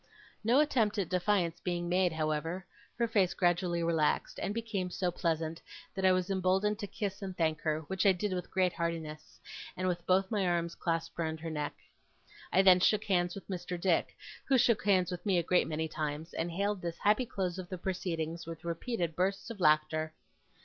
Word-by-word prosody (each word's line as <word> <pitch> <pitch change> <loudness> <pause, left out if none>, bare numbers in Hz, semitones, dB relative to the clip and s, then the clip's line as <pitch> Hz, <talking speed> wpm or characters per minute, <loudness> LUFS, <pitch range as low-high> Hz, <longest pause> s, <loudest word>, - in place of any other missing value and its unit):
No 240 +5 +4
attempt 235 -9 +2
at 195 -5 -1
defiance 180 -2 +1
being 175 -1 -2
made, 180 0 +2
however, 160 +3 -2 0.3
her 235 -1 +2
face 200 -5 +2
gradually 175 -1 +1
relaxed, 160 -3 +1
and - - -1
became 210 -4 -2
so 180 0 -1
pleasant, 165 -2 -2 0.3
that 190 - -4
I 185 - +7
was 185 +1 +1
emboldened 190 +2 +1
to 205 - -4
kiss 200 -1 -4
and 190 -2 -6
thank 160 -2 +1
her; 155 0 0
which 190 +6 0
I - - +8
did 190 +2 -1
with 180 -1 -4
great 185 -2 +1
heartiness, 165 -2 -4 0.4
and 185 0 -1
with 175 -1 -1
both 190 +2 +3
my 200 -4 +1
arms 170 -1 0
clasped 165 0 -3
round 160 -1 -2
her 165 0 -4
neck. 150 -1 -3 0.8
I 190 - +5
then 185 -1 +7
shook 215 +3 +3
hands 180 -4 +1
with 195 - -9
Mr. 180 -2 -4
Dick, 175 -2 +1 0.3
who 270 - +4
shook 235 -3 +3
hands 185 -3 +3
with 180 - -5
me 195 -4 +2
a 170 - +2
great 180 +2 +2
many 160 0 -2
times, 155 +1 -4
and 165 +1 -2
hailed 200 +3 -1
this 170 -1 -4
happy 215 +4 +2
close 185 -4 -2
of 180 -1 -7
the 185 - -4
proceedings 170 -3 -3
with 165 0 -8
repeated 170 -1 -2
bursts 195 +5 -1
of 220 - -8
laughter. 155 -1 +2
180 Hz, 200 wpm, -32 LUFS, 165-195 Hz, 0.8 s, I